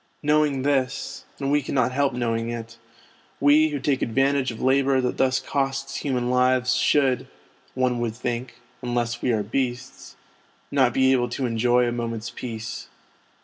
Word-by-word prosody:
Knowing 150 -3 +2
this 135 -2 -1
(and 140 0 -2
we 145 0 +3
cannot 130 -2 0
help 140 +1 +1
knowing 115 -1 -1
it), 115 -1 -7 0.6
we, 150 +2 +5
who 145 -2 -3
take 135 -1 0
advantage 135 +3 +1
of 115 - -7
labour 135 0 +3
that 125 -1 -1
thus 130 0 +2
costs 135 0 -2
human 125 -3 -1
lives 125 0 +3
should, 130 -1 +2 0.5
one 130 -2 +1
would 115 -2 -2
think 120 0 -4 0.3
(unless 120 -1 -2
we 125 - +1
are 110 -2 0
beasts), 125 +4 -4 0.6
not 130 -3 +3
be 130 +2 +3
able 120 -2 +2
to 130 +2 -2
enjoy 120 +1 +2
a - - 0
moment's 115 -1 -4
peace. 115 -2 -6
130 Hz, 155 wpm, -24 LUFS, 120-135 Hz, 0.6 s, we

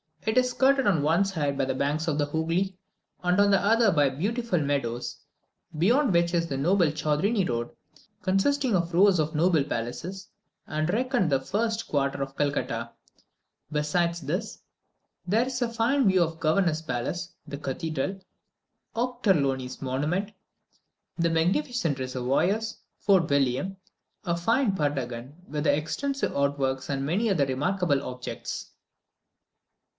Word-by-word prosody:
It 220 +2 0
is 250 0 +4
skirted 270 +1 +3
on 175 -7 +3
one 165 +6 +3
side 150 -8 -1
by 135 - +1
the 130 0 -2
banks 150 +4 -1
of 150 -3 0
the 145 -1 +1
Hoogly, 165 +5 -1 0.5
and 180 +2 +2
on 205 0 +5
the 195 - +5
other 225 +1 +4
by 145 -4 +3
beautiful 205 - -1
meadows, 135 -5 -2 0.6
beyond 240 - +3
which 170 0 +2
is 170 -1 +2
the 135 -4 -3
noble 175 +5 +3
Chaudrini 175 +7 +1
Road, 120 0 -2 0.5
consisting 230 +6 +2
of 170 -1 0
rows 190 0 +5
of 155 +1 0
noble 160 -1 +3
palaces, 170 - -5 0.4
and 155 +2 -1
reckoned 240 - +1
the 135 - +3
finest 220 +9 -1
quarter 140 -1 0
of 135 0 -4
Calcutta. 120 -5 -1 0.8
Besides 170 +3 0
this, 160 +7 -3 0.7
there 220 +6 +3
is 255 -1 -4
a 240 - +1
fine 235 +3 +2
view 185 -2 +5
of 165 - -1
the - - -19
governor's 160 0 +1
palace, 155 +6 -3
the 140 - -5
cathedral, 155 +6 -3 0.8
Ochterlony's 145 - 0
monument, 150 +10 -1 0.9
the 170 -1 +2
magnificent 170 - 0
reservoirs, 135 - 0 0.2
Fort 190 -5 +3
William, 140 +7 +1 0.5
a 170 -1 0
fine 225 +4 +2
prutagon 135 -5 -2
with 150 0 -2
extensive 215 - 0
outworks, 140 -2 0
and 135 -1 -1
many 200 +10 +1
other 165 -8 +2
remarkable 145 +2 0
objects. 125 0 -6
165 Hz, 140 wpm, -27 LUFS, 140-200 Hz, 0.9 s, on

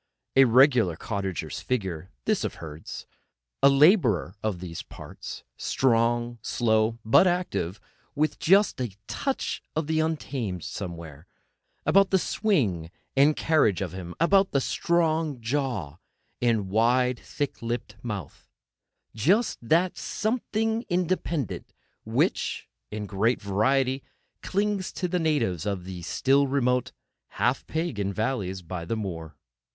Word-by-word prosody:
A 135 0 +8
regular 125 - +5
cottager's 95 -2 -4
figure, 95 -8 -3 0.2
this - - +1
of - - -3
Herd's—a 75 - -3
labourer 140 - +4
of 105 -4 -2
these 85 -2 -6
parts—strong, 120 -1 -1
slow, 110 0 +1
but 115 +11 +6
active, 175 - -1 0.4
with 155 +1 0
just 195 -5 +4
a 110 -6 -4
touch 275 - -2
of 160 0 0
the 160 +1 0
untamed 135 - -2
somewhere, 85 -4 -7 0.6
about 190 +5 +5
the 190 - +4
swing 125 - 0 0.3
and 145 +3 +5
carriage 155 - +2
of 90 -3 -3
him, 90 -2 -7
about 195 +4 +4
the 140 - +4
strong 160 -1 0
jaw, 115 - -2 0.4
and 115 -5 +1
wide 125 +3 +3
thick 145 -1 -4
lipped 115 -2 -4
mouth; 105 - -6 0.6
just 190 - +2
that 170 +9 +2
something 225 0 -1
independent, 175 - -1 0.3
which, - - 0 0.2
in 105 0 -5
great 105 +5 +1
variety, 130 +7 +1 0.4
clings 200 -1 -1
to 180 - -2
the 180 0 0
natives 145 - 0
of 100 -3 -2
these 90 -2 -7
still 140 +4 +3
remote, 125 -2 +1 0.5
half 120 +6 +1
pagan 125 - -2
valleys 100 -4 -2
by 85 0 -5
the 100 +7 -2
moor. 80 -7 -5
120 Hz, 120 wpm, -26 LUFS, 95-155 Hz, 0.6 s, A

